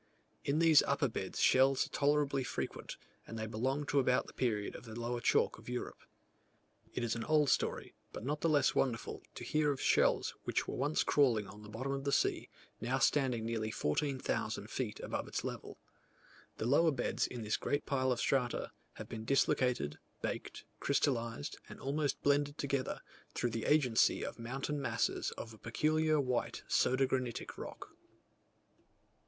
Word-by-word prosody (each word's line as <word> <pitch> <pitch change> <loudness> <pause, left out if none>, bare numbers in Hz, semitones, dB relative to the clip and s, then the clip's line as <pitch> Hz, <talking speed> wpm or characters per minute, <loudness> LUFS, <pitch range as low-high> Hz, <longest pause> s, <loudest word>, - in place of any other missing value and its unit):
In 140 +2 +1
these 160 -2 +7
upper 140 0 +1
beds 95 -5 -4
shells 135 +1 +5
are - - -13
tolerably 145 -1 +2
frequent; - - -4 0.3
and 115 - -6
they 110 - -2
belong 130 +7 -1
to 145 - +2
about 125 -1 +2
the - - -12
period 105 -5 -1
of - - -9
the 110 0 -7
lower 120 +1 -2
chalk - - +2
of 110 - -11
Europe. 125 0 -4 0.9
It 120 - -3
is 115 -1 0
an 115 - -3
old 150 -2 +4
story, - - 0 0.2
but 110 - -7
not 150 +2 -2
the 165 - +2
less 145 -3 +4
wonderful, 120 -4 -1
to - - -7
hear 150 -1 +2
of 135 - -3
shells - - +3
which - - -1
were - - -3
once 145 +4 +1
crawling 120 -8 +3
on 105 +2 -11
the 105 - -11
bottom 125 +6 -4
of 135 0 -2
the 140 - 0
sea, - - +1 0.3
now 125 +3 0
standing 130 -5 +2
nearly 110 -1 -1
14,000 130 - -1
feet - - -3
above - - -3
its - - -3
level. - - -6 0.8
The - - -3
lower 145 +7 +5
beds 145 - 0
in 120 -2 -6
this 105 0 0
great 145 - -1
pile 130 -2 +1
of 120 - 0
strata, 125 -2 0 0.2
have - - -8
been 110 -1 -6
dislocated, 125 - +1 0.2
baked, - - -4
crystallized 135 0 0
and - - -10
almost 145 +1 -1
blended 145 +1 +2
together, 140 -2 -2 0.3
through 120 - 0
the 115 0 -3
agency 130 -7 +3
of - - -7
mountain 135 +5 -3
masses 120 -3 0
of 115 - -7
a 110 - -15
peculiar 155 +6 +1
white 125 -3 -1
soda 130 +1 +3
granitic 130 -2 -2
rock. - - -8
130 Hz, 170 wpm, -34 LUFS, 115-145 Hz, 0.9 s, these